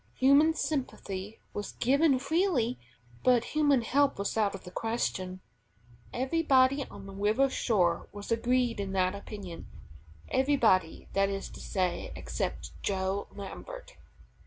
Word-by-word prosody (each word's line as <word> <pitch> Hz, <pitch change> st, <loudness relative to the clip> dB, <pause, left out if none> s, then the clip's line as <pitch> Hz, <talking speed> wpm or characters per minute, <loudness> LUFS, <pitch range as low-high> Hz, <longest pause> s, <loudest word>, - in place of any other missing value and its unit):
Human 285 Hz, +4 st, +5 dB
sympathy 215 Hz, -, -3 dB, 0.2 s
was 205 Hz, -1 st, -5 dB
given 275 Hz, +3 st, +3 dB
freely, 275 Hz, -, +1 dB, 0.4 s
but 245 Hz, -2 st, +4 dB
human 290 Hz, -5 st, +3 dB
help 280 Hz, +4 st, +2 dB
was 200 Hz, 0 st, -2 dB
out 210 Hz, -3 st, +1 dB
of 190 Hz, -, -10 dB
the 180 Hz, -, -10 dB
question. 185 Hz, -5 st, -2 dB, 0.7 s
Everybody 265 Hz, 0 st, +3 dB
on 195 Hz, -, -11 dB
the 195 Hz, -, -9 dB
river 215 Hz, +7 st, +2 dB
shore 180 Hz, -11 st, +1 dB
was 205 Hz, +1 st, -8 dB
agreed 240 Hz, 0 st, +1 dB
in 195 Hz, -1 st, -3 dB
that 185 Hz, 0 st, +2 dB
opinion. 200 Hz, -3 st, -8 dB, 0.6 s
Everybody, 235 Hz, -, +2 dB
that 195 Hz, 0 st, +2 dB
is 195 Hz, 0 st, -4 dB
to -, -, -11 dB
say, 185 Hz, -3 st, -2 dB
except -, -, -4 dB
Joe 190 Hz, 0 st, -1 dB
Lambert. -, -, -8 dB
230 Hz, 130 wpm, -30 LUFS, 195-275 Hz, 0.7 s, Human